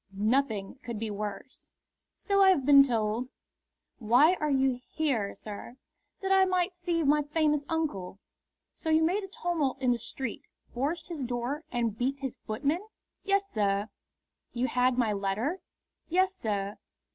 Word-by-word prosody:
"Nothing 220 0 0
could 235 -2 -5
be 220 0 -3
worse." 205 +4 -6 0.5
"So 395 -1 +1
I 385 - +7
have 290 -9 +3
been 280 -1 +9
told." 235 -1 0 0.7
"Why 250 +9 +5
are 305 - 0
you 265 -2 +2
here, 255 -11 -1
sir?" 215 +4 -9 0.4
"That 385 0 -1
I 385 0 +6
might 370 0 +1
see 345 -2 -1
my 295 +1 +4
famous 300 -1 0
uncle." 290 - -2 0.6
"So 320 - -5
you 315 0 +4
made 375 +6 +1
a - - -6
tumult 345 - -1
in 255 -2 +2
his 235 -2 -1
street, 260 -1 -4 0.3
forced 310 +7 -2
his 325 -4 -5
door, 250 +5 -3
and 235 -4 -1
beat 260 +4 -1
his 265 -3 -5
footman?" 280 +10 0 0.4
"Yes, 395 0 +1
sir." 205 0 0 0.6
"You 245 +1 0
had 250 -1 +2
my 230 -4 +2
letter?" 205 - -1 0.5
"Yes, 375 +3 +2
sir." 205 - -3
270 Hz, 155 wpm, -29 LUFS, 225-325 Hz, 0.7 s, been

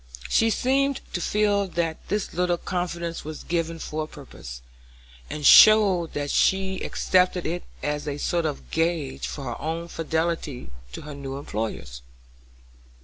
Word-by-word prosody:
She 225 - +4
seemed 270 +4 +1
to 175 - -2
feel 205 +1 +1
that 170 -3 -3
this 210 0 -2
little 180 0 +1
confidence 170 -2 -3
was 155 0 -7
given 165 -1 -2
for 155 -1 -4
a - - -14
purpose, 60 - -11 0.7
and 150 -1 -4
showed 195 -5 +7
that 145 -1 -2
she 190 -1 +2
accepted 180 -1 +1
it 175 +2 -3 0.2
as 150 0 -2
a 145 -1 -2
sort 170 +2 0
of 145 - -6
gage 165 -4 -1
for 140 - -6
her 120 -3 -5
own 165 +3 -3
fidelity 160 - -2 0.2
to - - -6
her 150 0 -8
new 135 -1 -6
employers. 105 - -5
165 Hz, 145 wpm, -25 LUFS, 145-180 Hz, 0.7 s, showed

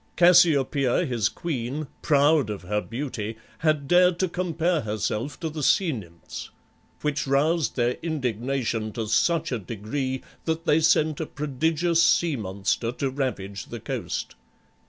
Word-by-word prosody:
Cassiopeia 155 -5 +4
his 120 -6 0
queen, 145 0 -3 0.2
proud 145 -3 +3
of 100 -3 -5
her 105 +3 -1
beauty, 115 -3 -5 0.2
had 155 -3 +1
dared 180 +1 +5
to 185 - +1
compare 170 -2 0
herself 110 +5 -3
to 165 - -1
the 155 -1 -5
Sea 170 +4 +3
Nymphs, 85 - -8 0.5
which 150 -1 -1
roused 150 +4 +2
their 120 0 +1
indignation 125 -6 -2
to 115 - -3
such 165 +9 +1
a 125 - -1
degree 120 +6 -4 0.2
that 160 0 -1
they 150 - +4
sent 155 -1 +3
a 160 - -3
prodigious 160 +4 0
sea 170 -2 +3
monster 100 +2 -1
to 135 +1 -2
ravage 100 - -3
the - - -7
coast. - - -4
140 Hz, 140 wpm, -25 LUFS, 115-160 Hz, 0.5 s, dared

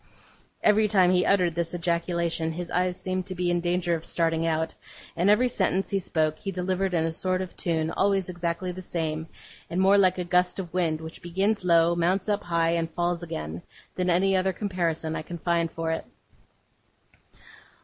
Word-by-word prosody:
Every 215 0 +4
time 190 -3 +4
he 180 0 +3
uttered 180 -4 +3
this 170 +1 -2
ejaculation, 170 -1 -1
his 175 0 -6
eyes 180 0 0
seemed 185 0 -3
to 185 - -4
be 175 0 0
in 175 - +1
danger 175 0 0
of 165 -1 -2
starting 165 -1 0
out; 160 0 0 0.4
and 175 +4 +2
every 210 +5 +5
sentence 195 -5 0
he 200 - +1
spoke, 155 -4 -1
he 195 - -4
delivered 185 0 -1
in 165 -1 +2
a 165 - -1
sort 185 +3 -1
of 185 -1 -6
tune, 160 -2 -1
always 195 0 +1
exactly 175 0 -3
the 185 +1 -8
same, 160 -3 -3 0.4
and 175 - -2
more 195 +2 +5
like 185 -1 +4
a 180 - -1
gust 180 +1 +2
of 180 -4 -6
wind, 165 -3 0
which 160 +1 -9
begins 195 +4 0
low, 170 -1 +4
mounts 180 +3 +1
up 210 -1 0
high, 165 -1 +1
and 165 -1 0
falls 175 +1 -1
again, 80 - -5 0.3
than 180 0 -1
any 190 +2 +3
other 190 0 +1
comparison 170 -6 -2
I - - -3
can 170 +2 -7
find 170 0 0
for 165 0 -3
it. 160 - -2
175 Hz, 190 wpm, -26 LUFS, 165-185 Hz, 0.4 s, every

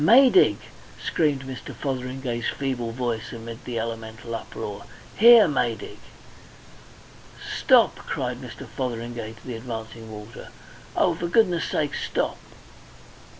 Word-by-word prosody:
"Maydig!" 260 - +7 0.4
screamed 145 -4 +1
Mr. 130 -1 -7
Fotheringay's 125 -3 -3
feeble 130 -4 -2
voice 120 -2 -3
amid 115 0 -8
the 120 -2 -3
elemental 115 0 -5
uproar. 105 -2 -6 0.3
"Here! 230 -1 +9
Maydig! 125 -6 -2 1.6
"Stop!" - - +5
cried - - -4
Mr. - - -8
Fotheringay 120 -3 -4
to 110 - -18
the 125 - -5
advancing 115 -1 -7
water. 105 +1 -9 0.5
"Oh, 175 - +3
for 170 +1 -3
goodness' 180 -3 +3
sake, 150 -2 0
stop! - - -2
120 Hz, 110 wpm, -25 LUFS, 115-145 Hz, 1.6 s, Here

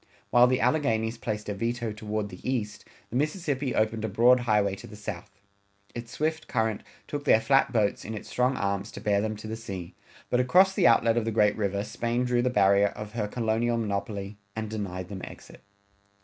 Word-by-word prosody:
While 120 0 +7
the 130 0 +1
Alleghanies 120 -4 +1
placed 105 -2 -4
a 105 - -2
veto 115 +2 -2
toward 105 -1 -3
the 90 -2 -10
east, 115 -5 -3 0.3
the - - -5
Mississippi 145 -3 -1
opened 110 0 0
a 110 - -1
broad 120 +5 +5
highway 105 -5 +2
to - - -11
the 105 - -11
south. 105 0 -6 0.6
Its 120 0 -7
swift 155 +1 -2
current 110 -3 0 0.3
took 145 -1 -4
their 110 - +5
flat 135 +4 +3
boats 105 -4 +1
in 110 +2 -5
its 105 - -8
strong 125 +1 +1
arms 100 +1 -1
to - - -7
bear 100 -1 +1
them 110 0 -2
to 105 - -8
the 110 - -4
sea, 95 -6 -7 0.4
but 125 - +3
across 185 +10 +5
the 190 -2 +4
outlet 115 0 +4
of 115 - +1
the - - 0
great 105 -2 +3
river 100 -1 -1
Spain 120 +3 -1
drew 125 -1 +2
the 125 - +1
barrier 100 -3 +4
of 105 0 -7
her 105 -2 -2
colonial 115 +1 0
monopoly 100 -1 -3 0.2
and 110 -1 -4
denied 95 -4 -4
them 95 0 -7
exit. - - -11
110 Hz, 205 wpm, -27 LUFS, 105-125 Hz, 0.6 s, While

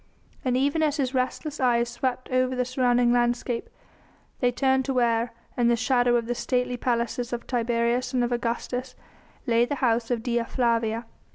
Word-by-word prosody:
And 255 -2 +1
even 285 +4 +1
as 305 -1 +1
his 265 -2 -1
restless 270 +4 -2
eyes 240 -2 +2
swept 255 +1 -3
over 255 0 +1
the 250 0 0
surrounding 245 -1 +2
landscape, 240 0 0 0.7
they 245 -1 +2
turned 265 +1 +2
to 270 - -2
where, 235 -1 +2 0.2
in 240 -1 +2
the 235 - +4
shadow 245 +1 +2
of 235 -1 +1
the 240 - -1
stately 250 +1 -1
palaces 240 0 -1
of 240 -1 -4
Tiberius 240 +1 0
and 250 -2 +1
of 240 - -1
Augustus, 245 +2 -2 0.5
lay 235 0 +3
the 285 +4 -1
house 235 -3 +1
of 235 -3 -1
Dea 240 -1 0
Flavia. 230 -2 0
245 Hz, 175 wpm, -26 LUFS, 235-255 Hz, 0.7 s, the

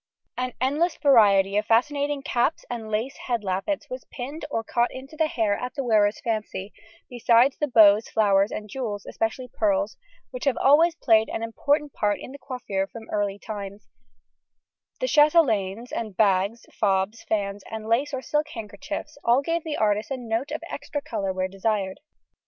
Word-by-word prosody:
An 250 0 -3
endless 295 +7 +1
variety 205 -8 +5
of 210 0 0
fascinating 285 +4 +1
caps 245 +6 0
and 225 -3 -5
lace 225 +6 -2
head 240 -4 -1
lappets 195 +10 -2
was 255 0 -7
pinned 280 +5 -6
or 225 -5 -2
caught 240 +2 0
into 270 +4 -10
the 315 0 +2
hair 220 -8 0
at 250 +5 -5
the 275 - -2
wearer's 215 -3 +3
fancy; 210 -3 -3 0.3
besides 245 +1 +3
the 295 - +1
bows, 215 -3 +6
flowers, 200 -2 +3
and 215 - -5
jewels 210 -3 -4
(especially 225 +3 -3
pearls) 295 +2 0 0.3
which - - -6
have 275 -3 +2
always 320 +5 +5
played 220 -8 +3
an 225 - -3
important 285 +6 0
part 205 -1 0
in - - -9
the 280 - -10
coiffure 205 -8 -3
from 225 +1 -11
early 205 -1 -1
times, 205 -2 -8 1.1
the - - 0
chatelaines 245 - +3
and 215 -5 -4
bags, 200 +2 +2
fobs, 195 +1 0
fans, 200 -2 -2
and 220 -1 -6
lace 250 +6 +1
or 265 -2 -4
silk 300 0 0
handkerchiefs 285 +7 -7
all 245 +4 +3
give 330 +2 -1
the 310 -2 -3
artist 210 0 +1
a 270 - -2
note 240 +3 -2
of 310 +2 -5
extra 290 -1 -5
colour 210 -8 -3
when 185 0 -2
desired. 195 0 -1
230 Hz, 170 wpm, -25 LUFS, 205-280 Hz, 1.1 s, bows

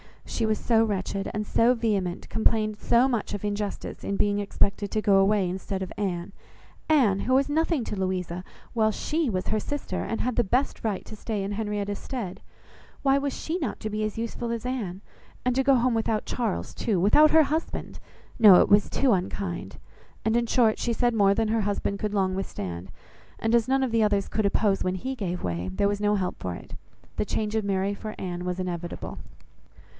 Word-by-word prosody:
She 225 - -1
was 215 -1 +1
so 225 0 +3
wretched 195 -2 -2
and 210 0 -3
so 235 +4 +3
vehement, 200 -6 -1
complained 215 -1 +1
so 240 +3 +4
much 235 -5 -2
of 205 - -5
injustice 205 0 -4
in 200 - -2
being 205 0 +1
expected 200 0 0
to 215 - -1
go 200 -2 +4
away 195 0 +3
instead 190 +1 -3
of 185 - -7
Anne; 190 -3 -3 0.6
Anne, 240 -11 +4
who 255 - 0
was 275 +2 +3
nothing 320 -2 +1
to 210 - -4
Louisa, 185 -2 -2 0.3
while 220 -2 +3
she 305 +7 -1
was 185 -3 -2
her 215 - +1
sister, 290 +6 -3
and 225 - -3
had 250 -1 -1
the 240 - +4
best 250 +7 0
right 215 -4 -2
to 220 - -9
stay 210 -1 -3
in 195 - -3
Henrietta's 205 -1 -2
stead! 225 -9 -5 0.6
Why 275 0 +4
was 280 0 -2 0.3
not 255 -8 -1
she - - -28
to 215 - -3
be 215 +1 -1
as 215 0 -3
useful 230 +1 -3
as 230 0 -3
Anne? 210 -8 -3 0.4
And 250 - +2
to 265 +2 +2
go 275 0 +5
home 245 0 +2
without 225 -1 0
Charles, 85 - -2
too, 205 -6 0
without 255 - +6
her 320 0 +6
husband! 310 +3 -3 0.4
No, 205 -5 +9
it - - +2
was 205 0 +5
too 270 -2 +2
unkind. 185 -1 -2 0.5
And 220 +1 +2
in 235 0 +2
short, 225 -2 +3
she 240 - 0
said 240 +1 +1
more 200 -2 +4
than 225 0 +1
her 225 0 +2
husband 200 0 -1
could 210 -1 -2
long 190 -2 +1
withstand, 95 - -5 0.5
and 225 +1 -1
as 235 -1 +4
none 265 0 +2
of 255 - -1
the 230 0 +2
others 205 -2 +2
could 215 -1 +1
oppose 200 0 +1
when 185 0 0
he 260 +8 -3
gave 185 -8 -4
way, 85 +1 -2
there 200 - +1
was 205 0 -2
no 210 0 +3
help 185 -2 -2
for 90 -1 -4
it; - - -11 0.4
the - - 0
change 215 0 -2
of 220 -2 0
Mary 195 0 0
for 215 +1 -7
Anne 180 -1 -4
was 180 0 -2
inevitable. 175 -2 -5
210 Hz, 210 wpm, -26 LUFS, 195-235 Hz, 0.6 s, No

